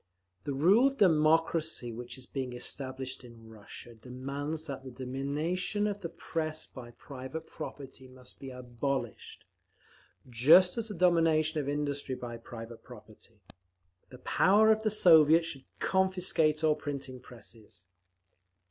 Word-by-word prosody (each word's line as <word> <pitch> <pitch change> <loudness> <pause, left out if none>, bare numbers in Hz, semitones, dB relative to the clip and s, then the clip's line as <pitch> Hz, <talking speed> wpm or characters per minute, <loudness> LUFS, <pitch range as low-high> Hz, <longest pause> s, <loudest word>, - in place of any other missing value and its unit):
The 140 - -2
rule 195 - +5
of 275 0 -3
the 200 - +6
democracy 160 -4 +1
which 120 +2 -8
is 130 - -11
being 130 -2 -5
established 130 +1 -4
in 115 -2 -14
Russia 110 +2 -12
demands 140 +7 -5
that 135 -3 -6
the 130 - -8
domination 140 - -2
of 205 -1 -3
the 170 - -4
Press 155 -1 -4
by 125 -3 -11
private 135 +5 -8
property 135 -4 -9
must 130 -1 -14
be 135 - -8
abolished, 125 -1 -5 0.8
just 150 +10 +5
as 225 - -3
the 210 - -6
domination 165 -3 +3
of 140 - -4
industry 145 -2 -2
by 120 -2 -7
private 115 0 -10
property…. 110 -2 -16 0.7
The 125 - -12
power 205 - +4
of 220 0 +2
the 220 - +1
Soviets 165 -5 +6
should 135 -4 -6
confiscate 180 -5 +1
all 155 -1 +4
printing 135 -4 -6
plants." 115 -5 -14
140 Hz, 140 wpm, -30 LUFS, 125-165 Hz, 0.8 s, the